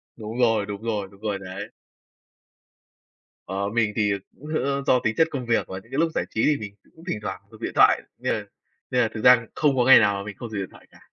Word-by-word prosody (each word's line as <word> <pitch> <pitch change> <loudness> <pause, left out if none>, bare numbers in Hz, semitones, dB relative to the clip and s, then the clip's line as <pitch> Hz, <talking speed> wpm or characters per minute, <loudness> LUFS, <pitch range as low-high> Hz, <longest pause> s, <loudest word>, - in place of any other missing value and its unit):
Đúng 110 +1 -7
rồi, 115 -4 +3
đúng 100 0 -6
rồi, 105 -4 -2
đúng 100 - -19
rồi 105 -2 -2
đấy. 100 +2 -7 1.8
Ờ, 100 +1 -2
mình 110 -1 +1
thì, 105 -1 +2
ờ, 100 - 0 0.2
cũng, 150 - -11 0.2
ơ, 140 0 -1
do 125 - +5
tính 110 -1 -1
chất 160 - +5
công 130 -4 -4
việc 115 -1 +1
và 95 0 -6
những 115 - -23
cái 135 - -3
lúc 165 -1 +2
giải - - 0
trí 110 - -1
thì 150 -1 +3
mình 100 -4 -8 0.2
cũng 160 - -16
thỉnh 140 - -2
thoảng 105 - -5
dùng 110 - -15
điện - - -3
thoại, - - +6 0.2
nên - - -1
là - - -3 0.5
nên 125 - +3
là 115 - +3
thực 110 - -6
ra 125 -2 +7
không 145 -3 +2
có 125 - +3
ngày 130 - +9
nào 100 -1 +3
mà 100 - -4
mình 105 -1 -7
không 120 - -7
dùng 105 - -4
điện 95 - -4
thoại - - -17
cả. - - -19
110 Hz, 265 wpm, -24 LUFS, 100-125 Hz, 1.8 s, ngày